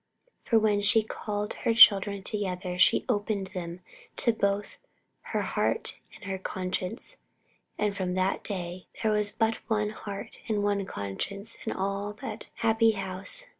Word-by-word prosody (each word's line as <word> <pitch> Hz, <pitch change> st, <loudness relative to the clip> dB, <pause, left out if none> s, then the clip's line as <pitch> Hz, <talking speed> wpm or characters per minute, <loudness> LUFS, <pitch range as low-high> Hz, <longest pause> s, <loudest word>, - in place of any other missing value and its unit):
For 230 Hz, -, +4 dB
when 210 Hz, -2 st, +3 dB
she 210 Hz, +2 st, +5 dB
called 210 Hz, -1 st, -4 dB
her 230 Hz, -, 0 dB
children 200 Hz, -2 st, +7 dB
together 185 Hz, -3 st, -3 dB
she -, -, +5 dB
opened 205 Hz, -4 st, -1 dB
to -, -, -20 dB
them 175 Hz, -1 st, -5 dB, 0.6 s
both 200 Hz, +1 st, 0 dB, 0.5 s
her -, -, 0 dB
heart 450 Hz, -, -1 dB, 0.2 s
and -, -, -15 dB
her 190 Hz, 0 st, -3 dB
conscience; 185 Hz, -, -4 dB, 0.6 s
and 210 Hz, -1 st, 0 dB
from 185 Hz, -2 st, -2 dB
that 185 Hz, +1 st, 0 dB
day 180 Hz, -2 st, -5 dB, 0.2 s
there 220 Hz, -, +3 dB
was 210 Hz, -1 st, +2 dB
but 225 Hz, 0 st, +1 dB
one 210 Hz, -1 st, +1 dB
heart 205 Hz, -2 st, -7 dB
and 210 Hz, -2 st, 0 dB
one 200 Hz, -1 st, 0 dB
conscience 195 Hz, -, -4 dB
in -, -, +1 dB
all 200 Hz, +2 st, -2 dB
that 220 Hz, +5 st, -7 dB
happy 225 Hz, 0 st, +3 dB
house. 195 Hz, -, 0 dB
205 Hz, 150 wpm, -28 LUFS, 190-215 Hz, 0.6 s, children